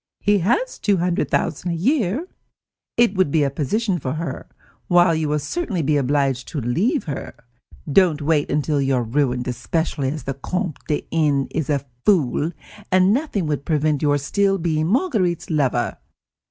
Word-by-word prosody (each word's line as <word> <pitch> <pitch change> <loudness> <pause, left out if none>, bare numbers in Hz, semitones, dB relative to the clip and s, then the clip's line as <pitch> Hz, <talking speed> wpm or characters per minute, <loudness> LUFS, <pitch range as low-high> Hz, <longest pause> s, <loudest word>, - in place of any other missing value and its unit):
He 205 0 +3
has 415 - 0
two 205 -2 +2
hundred 175 0 0
thousand 180 - -1
a 170 - -1
year. 245 - 0 0.7
It 235 -4 +4
would 185 -6 +2
be 150 +1 +2
a 140 - 0
position 180 - -1
for 130 -2 -3
her, 165 +2 -5 0.4
while 175 -1 +5
you 160 -2 -1
will 150 - +1
certainly 185 - -2
be 150 +1 +2
obliged 135 -2 +1
to 150 - -4
leave 175 - 0
her. 140 -3 -6 0.6
Don't 170 -2 +4
wait 150 -1 +1 0.2
till 145 -2 0
you 135 -1 +1
are 125 - +1
ruined, 125 +1 0
especially 140 +2 -1
as 155 +2 -5
the 135 - -3
Comte 180 +4 -3
de 150 - -1
N. 145 -4 +2
is 155 0 -2
a 140 -2 0 0.2
fool, 165 -4 +2 0.4
and 185 +2 +5
nothing 245 - -1
would 145 -2 -2
prevent 150 -2 +1
your 145 -1 +3
still 195 +7 +1
being 160 -3 0
Marguerite's 205 - 0
lover. 135 -6 0
160 Hz, 170 wpm, -21 LUFS, 140-190 Hz, 0.7 s, while